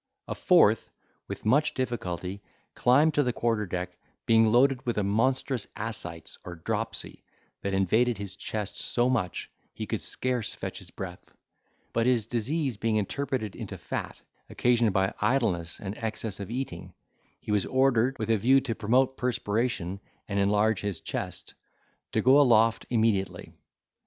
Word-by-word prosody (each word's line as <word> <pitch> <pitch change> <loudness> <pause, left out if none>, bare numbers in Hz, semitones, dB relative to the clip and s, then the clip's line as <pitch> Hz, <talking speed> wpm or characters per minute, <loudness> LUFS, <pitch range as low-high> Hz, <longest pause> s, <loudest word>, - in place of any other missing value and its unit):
A - - -2
fourth, - - +4 0.4
with - - -7
much 145 +7 +3
difficulty, 100 -6 -3 0.3
climbed 145 +6 +4
to 145 - +3
the 125 -3 +1
quarter 115 -3 0
deck, 90 0 -4 0.3
being 115 0 +5
loaded 130 +2 +4
with 120 -4 -2
a 105 - +2
monstrous 120 +4 0
ascites, 95 -7 -4
or 90 - -7
dropsy, 80 - -3 0.4
that 100 -1 -1
invaded 110 +5 +2
his 100 -1 -6
chest 105 -2 -4
so 120 +1 +1
much, 95 -9 -2 0.2
he - - -4
could - - -3
scarce 125 -3 -2
fetch - - -5
his - - -12
breath; 90 -2 -8 0.6
but 115 +1 +2
his 120 -4 +2
disease 125 +3 -1
being 115 +1 0
interpreted 110 0 -2
into - - -6
fat, - - -5 0.3
occasioned 120 -3 +2
by 95 0 +1
idleness 90 -11 0
and 100 0 -5
excess 110 -2 -3
of 100 - -6
eating, 120 -8 -5 0.4
he - - -6
was 105 -2 +2
ordered, 130 -1 +2
with 110 0 -1
a 110 - +4
view 130 +7 +5
to 130 -3 -3
promote 125 +5 +2
perspiration 110 -5 -1 0.3
and 100 -1 -1
enlarge 105 +1 +2
his 100 -5 -3
chest, - - -5 0.6
to - - 0
go 135 +3 +7
aloft 115 -4 +4
immediately. 110 -5 0
115 Hz, 150 wpm, -28 LUFS, 100-125 Hz, 0.6 s, go